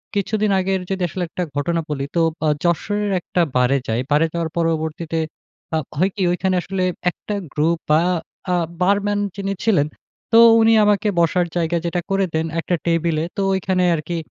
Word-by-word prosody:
কিছুদিন 210 +1 0
আগের 190 0 0
যদি 190 -1 -2
আসলে 180 +1 -3
একটা 180 - -3
ঘটনা 165 +4 0
বলি। 140 -2 -2
তো 170 - +3 0.2
আ - - +3 0.2
যশোরের 205 +4 0
একটা 175 - -1 0.2
বারে 125 +2 +3
যাই। 110 +1 0
বারে 150 +2 +4
যাওয়ার 170 -1 -2
পরবর্তীতে 165 0 -1 0.6
আ - - +3 0.2
হয় 185 +4 +3
কি? 205 - -4
ওইখানে 185 +1 0
আসলে 190 0 -3 0.3
একটা 210 - -7 0.2
গ্রুপ 160 +3 +1
বা 155 +1 +5 0.5
আ - - +3 0.3
বারম্যান 205 +2 +2 0.2
যিনি 195 0 -2
ছিলেন, 180 -10 +3 0.4
তো 225 - +6 0.2
উনি 225 0 +5
আমাকে 210 +1 +2
বসার 170 +1 +2
জায়গা 170 0 +1
যেটা 175 +1 -1
করে 195 0 +2
দেন 160 0 0
একটা 175 - 0
টেবিলে। 165 -2 +1
তো - - 0
ওইখানে 185 -1 0
আরকি 165 +2 -4
175 Hz, 170 wpm, -20 LUFS, 160-195 Hz, 0.6 s, তো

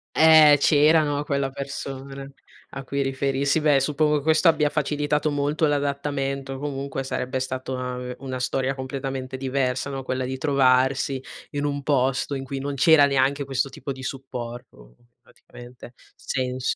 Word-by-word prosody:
Eh, 155 -2 +7
c'era 155 +2 +5
no, 145 0 -1
quella 140 -2 -1
persona, 135 0 -7 0.4
a 135 0 -7
cui 140 +1 -2
riferirsi. 135 +2 0
Beh, 145 -3 +4
suppongo 150 0 +1
questo 160 +3 +3
abbia 150 -2 +4
facilitato 150 0 0
molto 145 +2 0
l'adattamento, 140 -1 -2
comunque 140 -1 -4
sarebbe 130 0 -3
stato 130 0 -4
una 125 0 -4
ve 125 0 -6
una 130 -2 -5
storia 135 +1 -1
completamente 130 0 -5
diversa, 130 0 -1
no, 135 -1 -5
quella 130 0 -2
di 130 +1 -4
trovarsi 130 -1 +2 0.3
in 145 0 -2
un 140 -1 -2
posto 135 0 +1
in 135 -1 -3
cui 135 0 -5
non 140 +1 -4
c'era 145 +1 +6
neanche 140 +1 +1
questo 135 0 -1
tipo 140 - -7
di 130 0 -7
supporto, 120 - -8 0.3
praticamente, 120 0 -14 0.2
senso. 130 -1 -2
135 Hz, 150 wpm, -24 LUFS, 130-145 Hz, 0.4 s, Eh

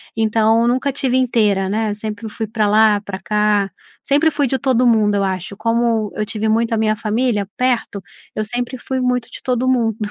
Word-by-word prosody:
Então 225 0 +2
eu 235 - +2
nunca 255 +3 0
estive 265 -2 0
inteira 215 -6 +1
né. 215 +1 -1
Sempre 215 +1 -6
fui 220 0 -5
pra 215 0 0
lá, 210 -1 +4
pra 195 -2 -7
cá, 210 -1 +1 0.3
sempre 290 +3 +2
fui 285 -2 0
de 265 - 0
todo 255 -2 +2
mundo 215 -3 +3
eu 200 - +1
acho. 190 +1 -3
Como 230 -2 0
eu 215 - -2
tive 220 0 -3
muito 230 +1 +1
a 225 - +1
minha 215 0 +1
família 215 0 -1
perto, 245 -5 -1 0.3
eu 215 - -2
sempre 245 +3 -3
fui 260 +1 -3
muito 250 -1 -1
de - - -9
todo 255 0 0
mundo. 230 -4 +1
225 Hz, 200 wpm, -18 LUFS, 210-245 Hz, 0.3 s, lá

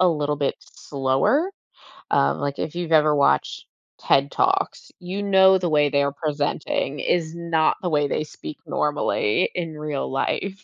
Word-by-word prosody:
a 185 - +5
little 150 -2 0
bit 140 -1 -1
slower. 140 - -1 0.6
Um, - - +2
like, 140 0 -3
if 155 - -4
you've 175 -1 -4
ever 150 -1 +5
watched 140 - +1 0.3
TED 140 +1 +2
Talks, 385 +1 0
you 185 +2 -5
know 190 -1 +5
the 180 -2 -1
way 150 -1 +3
they're 140 0 +1
presenting 145 -1 -2
is 165 0 0
not 170 -2 +1
the 180 - -1
way 145 -3 +1
they 155 - -1
speak 155 -1 -10
normally 145 - 0
in 165 -3 -4
real 150 -3 -3
life. 190 +8 -2
155 Hz, 160 wpm, -23 LUFS, 145-180 Hz, 0.6 s, a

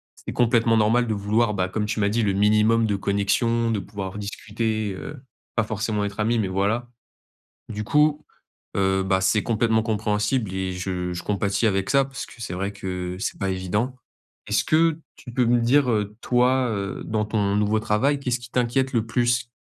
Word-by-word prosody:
c'est - - -8
complètement 115 -1 +3
normal 115 +3 +3
de 110 - 0
vouloir, 105 +2 +1
bah, 95 -1 0
comme 105 +3 -2
tu 110 - -2
m'as 100 -1 +2
dit: 115 +3 +1
«Le 100 -3 +1
minimum 105 +3 +3
de 105 -2 0
connexion, 110 +4 +1
de 110 - 0
pouvoir 100 0 -6
discuter, 105 +1 -3
heu, 145 +9 -8 0.4
pas 115 - +2
forcément 110 -1 -2
être 100 +1 -6
amis 115 +2 +2
mais 105 - 0
voilà». 100 +6 0 0.8
Du 105 0 -4
coup, 150 +4 +2 0.5
heu, 95 0 +2
bah, 95 0 +1
c'est 95 +3 +3
complètement 115 -1 +1
compréhensible 105 0 0
et 95 -1 -2
je 90 -1 -3
je 90 - -6
compatis 100 +2 0
avec 95 0 0
ça, 135 0 +4
parce 135 -1 -6
que 115 - -14
c'est 100 - -4
vrai 100 +3 -3
que 90 -2 -4
c'est - - -3
pas 100 -2 -1
évident. 105 +7 -2 0.5
Est-ce - - +1
que 160 0 +3 0.2
tu 120 - -11
peux 125 0 +1
me 120 0 +3
dire, 130 +3 +3
heu, 105 -1 -1
toi, 125 +1 +2
heu, 100 -3 -3
dans 110 -1 0
ton 105 -2 0
nouveau 105 +1 +2
travail, 110 +7 +1
qu'est-ce 125 -3 -1
qui 120 -2 -11
t'inquiète 125 +2 +1
le 115 -4 0
plus? 120 +1 +1
110 Hz, 195 wpm, -24 LUFS, 100-120 Hz, 0.8 s, ça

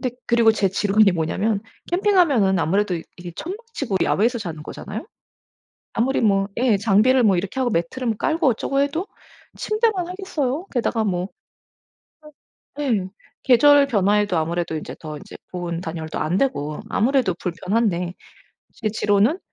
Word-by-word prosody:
근데 250 -2 -3
그리고 235 -1 +5
제 210 -3 +1
지론이 200 0 +3
뭐냐면 195 +6 -1 0.3
캠핑하면은 350 - +3
아무래도 190 +3 +1
이 165 - -6 0.2
이게 175 -1 -8
천막 375 +5 -5 0.2
치고 230 -9 -2
야외에서 235 +4 +1
자는 165 -7 -6
거잖아요. 205 - -7 0.9
아무리 260 +4 +1
뭐 195 -3 +2
예 240 -4 +3
장비를 225 +5 +3
뭐 200 -5 +4
이렇게 190 +8 -3
하고 245 -2 +1
매트를 220 +7 -1
깔고 320 -2 +1
어쩌고 275 +3 0
해도 300 +7 -1 0.5
침대만 430 -5 0
하겠어요? 345 -5 -3
게다가 230 -3 0
뭐 185 -2 -1 1.5
에 - - -1
예. 190 -4 -1 0.4
계절 285 +3 +6
변화에도 205 -4 +2
아무래도 165 +1 -1
인제 155 - -6
더 155 -2 -7
인제 - - -12 0.2
보온, 175 -1 -4
단열도 160 -2 -5
안 170 +4 0
되고 155 - -1
아무래도 250 -3 +2
불편한데 180 0 -1 0.6
제 220 - -3
지론은 210 - +2
215 Hz, 340 characters per minute, -22 LUFS, 180-265 Hz, 1.5 s, 계절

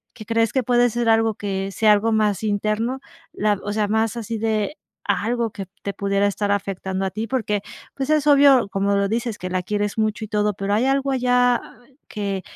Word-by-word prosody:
que 215 - -10
crees 230 -1 +1
que 265 - +2
puede 245 0 +3
ser 235 0 0
algo 225 0 +3
que 195 -1 -3
sea 215 +2 +3
algo 210 +2 +3
más 215 -2 +1
interno 215 +4 -1 0.3
la 210 0 0
o 205 - -3
sea, 210 -1 0
más 220 +2 0
así 230 -1 -4
de 220 +5 -1 0.3
algo 235 +1 0
que 200 -2 -7 0.2
te 200 - -3
pudiera 200 0 +1
estar 200 +1 -2
afectando 190 -1 -3
a 190 - 0
ti, 220 +3 -4
porque, 210 -5 -1 0.3
pues, 270 +1 -4
es 305 -2 +2
obvio, 280 -6 +6
como 200 +1 0
lo 200 0 +1
dices, 230 0 -2
que 185 - -5
la 185 0 -1
quieres 205 +3 -2
mucho 215 0 0
y 215 - -6
todo. 210 -1 +1
Pero 195 +1 -2
hay 220 +5 +2
algo 275 0 +1
allá 245 -1 +2 0.5
que 200 -2 -3
215 Hz, 205 wpm, -22 LUFS, 200-235 Hz, 0.5 s, obvio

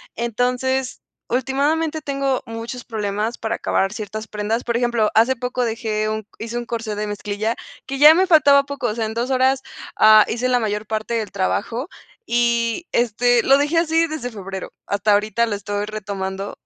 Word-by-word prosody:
Entonces 250 +2 -1 0.3
últimadamente 290 +5 0
tengo 275 -2 -1
muchos 230 +2 -6
problemas 215 +1 -2
para 225 0 -2
acabar 195 0 0
ciertas 215 0 -6
prendas. 215 +3 -2
Por 235 -1 -1
ejemplo, 235 -3 +1
hace 235 +4 +4
poco 250 0 -2
dejé 220 -2 -2
un 215 -1 -4
hice 230 +1 -6
un 240 - -4
corsé 225 -2 -3
de 210 +1 -3
mezclilla 210 +2 -3 0.3
que 275 - -4
ya 300 +2 +10
me 375 +2 +3
faltaba 285 -5 +6
poco, 280 -3 -3
o 215 - -1
sea, 230 -1 -1
en 220 - -6
2 240 +3 -1
horas, 260 +1 +2 0.4
ah, 215 0 +8
hice 245 +2 -1
la 250 - +3
mayor 210 -1 -2
parte 220 +2 -2
del 220 -4 -2
trabajo 225 - -2 0.4
y 235 +5 +1
este 240 +1 +2
lo 275 - +5
dejé 295 +4 +2
así 330 0 +2
desde 310 -6 -4
febrero. 195 -2 -7 0.2
Hasta 200 +1 +2
ahorita 215 +3 +2
lo 215 - -2
estoy 205 0 -3
retomando 200 -2 -5
235 Hz, 175 wpm, -21 LUFS, 215-260 Hz, 0.4 s, ya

